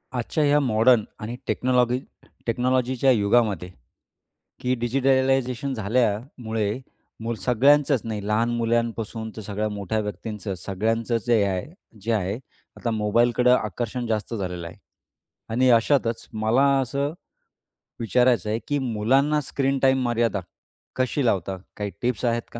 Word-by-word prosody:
आजच्या 125 Hz, +5 st, 0 dB
ह्या 145 Hz, 0 st, +4 dB
मॉडर्न 115 Hz, -3 st, +4 dB, 0.2 s
आणि 110 Hz, +3 st, -5 dB
टेक्नॉलॉगी 125 Hz, 0 st, +2 dB, 0.5 s
टेक्नॉलॉजीच्या 130 Hz, +2 st, +2 dB
युगामध्ये, 105 Hz, -4 st, +2 dB, 0.9 s
की 125 Hz, +1 st, +1 dB
डिजिटलायझेशन 135 Hz, +1 st, +1 dB
झाल्यामुळे 110 Hz, -1 st, -1 dB, 0.5 s
मुलं 115 Hz, -1 st, -3 dB
सगळ्यांचंच 140 Hz, +2 st, +4 dB
नाही 105 Hz, -3 st, -4 dB
लहान 110 Hz, +2 st, +2 dB
मुलांपासून 115 Hz, -1 st, -1 dB
तर -, -, -5 dB
सगळ्या 105 Hz, +1 st, -2 dB
मोठ्या 105 Hz, +1 st, -2 dB
व्यक्तींचं 105 Hz, 0 st, -5 dB
सगळ्यांचं 115 Hz, +5 st, -1 dB
जे 115 Hz, -3 st, +4 dB
आहे 110 Hz, -, -6 dB
जे 115 Hz, +4 st, -2 dB
आहे, 100 Hz, -2 st, 0 dB, 0.4 s
आता 120 Hz, -, -2 dB
मोबाईलकडं 120 Hz, +3 st, +3 dB
आकर्षण 120 Hz, +3 st, -3 dB
जास्त 110 Hz, +1 st, -2 dB
झालेलं 90 Hz, -4 st, -4 dB
आहे -, -, -11 dB, 0.8 s
आणि 130 Hz, +2 st, +3 dB
अशातच 115 Hz, 0 st, +2 dB
मला 110 Hz, +5 st, +2 dB, 0.2 s
असं 140 Hz, +3 st, -2 dB, 0.9 s
विचारायचं 120 Hz, -2 st, +2 dB
आहे, 110 Hz, +2 st, 0 dB
की 145 Hz, 0 st, 0 dB
मुलांना 135 Hz, +5 st, +2 dB
स्क्रीन 135 Hz, 0 st, -1 dB
टाईम 130 Hz, -1 st, +3 dB
मर्यादा 115 Hz, -4 st, 0 dB, 0.6 s
कशी 130 Hz, +2 st, 0 dB
लावता 95 Hz, -4 st, 0 dB, 0.2 s
काही 105 Hz, -1 st, -3 dB
टिप्स 125 Hz, 0 st, -1 dB
आहेत 120 Hz, -1 st, +1 dB
का? 115 Hz, -, -6 dB
115 Hz, 125 wpm, -24 LUFS, 105-130 Hz, 0.9 s, ह्या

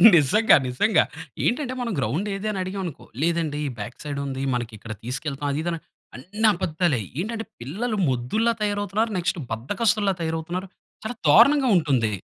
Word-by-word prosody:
నిజంగా 170 Hz, +9 st, +5 dB
నిజంగా 165 Hz, -, +3 dB, 0.4 s
ఏంటంటే, 255 Hz, 0 st, 0 dB
మనం 235 Hz, -2 st, -2 dB
గ్రౌండ్ 140 Hz, -, -1 dB
ఏది? 205 Hz, +2 st, -4 dB
అని 195 Hz, -, -3 dB
అడిగాం 190 Hz, +1 st, -4 dB
అనుకో, 165 Hz, -, -7 dB, 0.2 s
"లేదండి 165 Hz, -3 st, 0 dB, 0.2 s
బ్యాక్ 120 Hz, +4 st, -6 dB
సైడ్ 145 Hz, -1 st, -4 dB
ఉంది, 135 Hz, 0 st, -3 dB
మనకి 120 Hz, -2 st, -3 dB
ఇక్కడ 110 Hz, +1 st, -7 dB
తీసుకెళ్తాం" 140 Hz, +3 st, -3 dB
అది 145 Hz, -, -1 dB
ఇది 175 Hz, -, -1 dB
అన -, -, -2 dB, 0.4 s
అన్నీ 205 Hz, -, 0 dB
అబద్దాలే! 170 Hz, -6 st, 0 dB, 0.2 s
ఏంటంటే 225 Hz, +3 st, -3 dB, 0.2 s
పిల్లలు 215 Hz, -, -2 dB
మొద్దుల్లా 175 Hz, -, +1 dB
తయారవుతున్నారు, 205 Hz, +2 st, 0 dB
నెక్స్ట్ 180 Hz, +1 st, 0 dB
బద్దకస్తుల్లా 200 Hz, -, +1 dB
తయారవుతున్నారు. 165 Hz, +3 st, -3 dB, 0.4 s
చాలా 225 Hz, +2 st, -4 dB
దారుణంగా 260 Hz, -, +6 dB
ఉంటుంది. 130 Hz, -9 st, +1 dB
175 Hz, 150 wpm, -24 LUFS, 140-215 Hz, 0.4 s, దారుణంగా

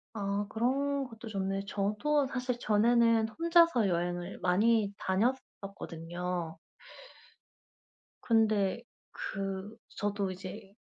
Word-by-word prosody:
아 200 Hz, 0 st, -1 dB
그런 275 Hz, +5 st, 0 dB
것도 225 Hz, -1 st, -10 dB
좋네요. 195 Hz, -1 st, -2 dB
저도 215 Hz, +9 st, +1 dB
사실 250 Hz, -2 st, -2 dB
전에는 230 Hz, +1 st, +3 dB
혼자서 335 Hz, -, +4 dB
여행을 175 Hz, +1 st, -2 dB
많이 205 Hz, +2 st, +3 dB
다녔었거든요. 180 Hz, -6 st, -3 dB, 1.6 s
근데 220 Hz, -2 st, +2 dB, 0.3 s
그 195 Hz, +1 st, -4 dB, 0.2 s
저도 205 Hz, -2 st, -1 dB
이제 190 Hz, +1 st, -9 dB
205 Hz, 200 characters per minute, -31 LUFS, 190-235 Hz, 1.6 s, 혼자서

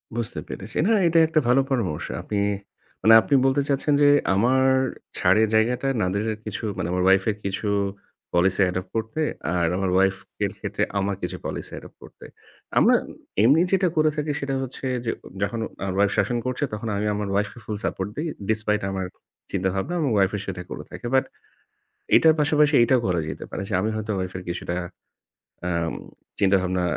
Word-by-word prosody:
বুঝতে 120 Hz, 0 st, -2 dB
পেরেছি। 100 Hz, +3 st, -7 dB
না, -, -, +3 dB, 0.2 s
এটা 165 Hz, 0 st, +4 dB
একটা 155 Hz, 0 st, +2 dB
ভালো 125 Hz, +3 st, +5 dB
পরামর্শ। 110 Hz, -, -1 dB
আপনি, 105 Hz, -, -4 dB, 0.6 s
মানে 115 Hz, -, +6 dB
আপনি 140 Hz, -, -2 dB
বলতে 135 Hz, +1 st, +3 dB
চাচ্ছেন 140 Hz, +1 st, +2 dB
যে 145 Hz, -, +6 dB, 0.3 s
আমার 125 Hz, +6 st, +3 dB, 0.5 s
ছাড়ের 105 Hz, +5 st, +4 dB
জায়গাটা 120 Hz, +4 st, +2 dB
না 90 Hz, -, +1 dB
দিয়ে 110 Hz, +2 st, -1 dB
কিছু, 105 Hz, -1 st, -5 dB
মানে 85 Hz, -2 st, -2 dB
আমার 90 Hz, 0 st, 0 dB
wife 95 Hz, 0 st, +4 dB
এর 105 Hz, -, -7 dB
কিছু 100 Hz, +2 st, -2 dB, 0.7 s
policy 90 Hz, +3 st, +3 dB
adopt 90 Hz, 0 st, -4 dB
করতে, 110 Hz, +8 st, -2 dB, 0.3 s
আর 85 Hz, -1 st, +2 dB
আমার 95 Hz, -1 st, 0 dB
wife 95 Hz, 0 st, +2 dB, 0.3 s
এর -, -, -2 dB
ক্ষেত্রে -, -, -2 dB, 0.2 s
আমার 100 Hz, 0 st, -1 dB
কিছু 90 Hz, -, -4 dB
policy -, -, -4 dB
adopt -, -, -14 dB
করতে। -, -, -14 dB, 0.5 s
আমরা -, -, +6 dB, 0.5 s
এমনি 140 Hz, +8 st, +5 dB
যেটা 190 Hz, -1 st, +3 dB
করে 155 Hz, 0 st, +4 dB
থাকি 150 Hz, -1 st, -1 dB
সেটা 140 Hz, -1 st, -2 dB
হচ্ছে 130 Hz, +1 st, -7 dB, 0.2 s
যে, 115 Hz, -, +1 dB, 0.3 s
যখন 115 Hz, +3 st, -1 dB, 0.2 s
আমার 95 Hz, -1 st, -2 dB
wife 100 Hz, 0 st, +3 dB
শাসন 120 Hz, -, +1 dB
করছে 130 Hz, +3 st, -2 dB
তখন 105 Hz, +2 st, -4 dB
আমি 105 Hz, -, -1 dB
আমার 105 Hz, 0 st, -3 dB
wife 100 Hz, 0 st, +1 dB
কে -, -, -13 dB
full 105 Hz, -1 st, -3 dB
support 95 Hz, +1 st, -2 dB
দেই, 155 Hz, +3 st, -2 dB, 0.2 s
despite 110 Hz, -2 st, +1 dB
আমার 95 Hz, -1 st, -3 dB, 0.5 s
চিন্তাভাবনা 95 Hz, -, -1 dB
এবং 150 Hz, -, +1 dB
wife 95 Hz, 0 st, +3 dB
ও -, -, -5 dB
সেটা 90 Hz, -2 st, -4 dB
করে -, -, -6 dB
থাকে। -, -, -9 dB
But 130 Hz, -, +3 dB, 0.9 s
এটার 160 Hz, -1 st, +6 dB
পাশাপাশি 150 Hz, 0 st, +3 dB
এটাও 125 Hz, +1 st, +4 dB
করা 90 Hz, -3 st, +1 dB
যেতে -, -, -6 dB
পারে 95 Hz, -, -4 dB
যে -, -, -7 dB
আমি 110 Hz, +3 st, 0 dB
হয়তো 110 Hz, 0 st, -3 dB
wife 95 Hz, 0 st, -4 dB
এর -, -, -8 dB
কিছুটা 85 Hz, 0 st, -3 dB, 0.9 s
অ্যাম 85 Hz, -2 st, -1 dB, 0.5 s
চিন্তাভাবনা 95 Hz, -2 st, +2 dB
105 Hz, 180 wpm, -24 LUFS, 95-130 Hz, 0.9 s, মানে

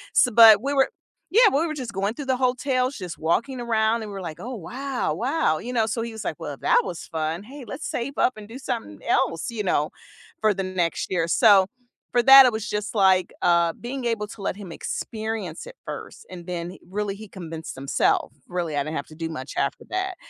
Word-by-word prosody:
s -, -, +6 dB
but 220 Hz, -2 st, +9 dB
we 280 Hz, +3 st, -1 dB
were 270 Hz, -1 st, +3 dB, 0.4 s
yeah, 450 Hz, +3 st, +6 dB
we 310 Hz, +5 st, +2 dB
were 310 Hz, -, -3 dB
just 255 Hz, -6 st, -5 dB
going 195 Hz, +2 st, -1 dB
through 285 Hz, +4 st, -7 dB
the 260 Hz, -1 st, +2 dB
hotels, 255 Hz, +1 st, 0 dB
just 180 Hz, -4 st, -6 dB
walking 235 Hz, -, 0 dB
around, 225 Hz, -1 st, +1 dB
and 215 Hz, -2 st, -6 dB
we're 195 Hz, -1 st, -6 dB
like, 160 Hz, -4 st, -7 dB
“Oh 250 Hz, +2 st, -6 dB
wow, 255 Hz, +7 st, -3 dB
wow,” 260 Hz, -, +1 dB
you 250 Hz, +2 st, -6 dB
know, 225 Hz, -3 st, +2 dB
so 230 Hz, +1 st, -2 dB
he 230 Hz, 0 st, -5 dB
was 220 Hz, -1 st, -7 dB
like, -, -, -3 dB
“Well, -, -, -5 dB
that 485 Hz, -, +4 dB
was 170 Hz, -, -5 dB
fun, 160 Hz, +3 st, -3 dB
hey, 265 Hz, +4 st, -10 dB
let's 270 Hz, +8 st, -6 dB
save 250 Hz, +4 st, -3 dB
up 255 Hz, -, +3 dB
and 210 Hz, -1 st, -10 dB
do 230 Hz, +4 st, -9 dB
something 230 Hz, -, -5 dB
else,” 165 Hz, +7 st, +1 dB
you 225 Hz, -2 st, -3 dB
know, 155 Hz, -5 st, +1 dB, 0.5 s
for 215 Hz, -1 st, +4 dB
the 195 Hz, 0 st, -3 dB
next 185 Hz, -2 st, -2 dB
year. 170 Hz, -3 st, +1 dB
So, 200 Hz, +1 st, +6 dB, 0.5 s
for 240 Hz, -, +3 dB
that 270 Hz, +1 st, +10 dB
it 250 Hz, -, +3 dB
was 220 Hz, +1 st, -4 dB
just 210 Hz, +2 st, -3 dB
like, 190 Hz, -3 st, +4 dB
uh, 170 Hz, -1 st, +3 dB
being 255 Hz, +1 st, -6 dB
able 225 Hz, -3 st, -1 dB
to 205 Hz, -, -11 dB
let 195 Hz, -, -2 dB
him 195 Hz, -4 st, -9 dB
experience 215 Hz, -2 st, -5 dB
it -, -, -11 dB
first, -, -, -8 dB
and 175 Hz, -1 st, -10 dB
then 175 Hz, -1 st, -4 dB
h -, -, -15 dB
really 205 Hz, +1 st, -2 dB
he 215 Hz, +1 st, -10 dB
convinced 160 Hz, -5 st, -8 dB
himself, 135 Hz, -1 st, +1 dB, 0.2 s
really, 175 Hz, -4 st, -3 dB
I 140 Hz, -, +1 dB
didn't 155 Hz, +1 st, -4 dB
have 140 Hz, -, -5 dB
to 155 Hz, -, -13 dB
do 165 Hz, 0 st, -4 dB
much 135 Hz, -4 st, -6 dB
after 140 Hz, -, -1 dB
that. 375 Hz, 0 st, -2 dB
215 Hz, 230 wpm, -24 LUFS, 175-250 Hz, 0.5 s, that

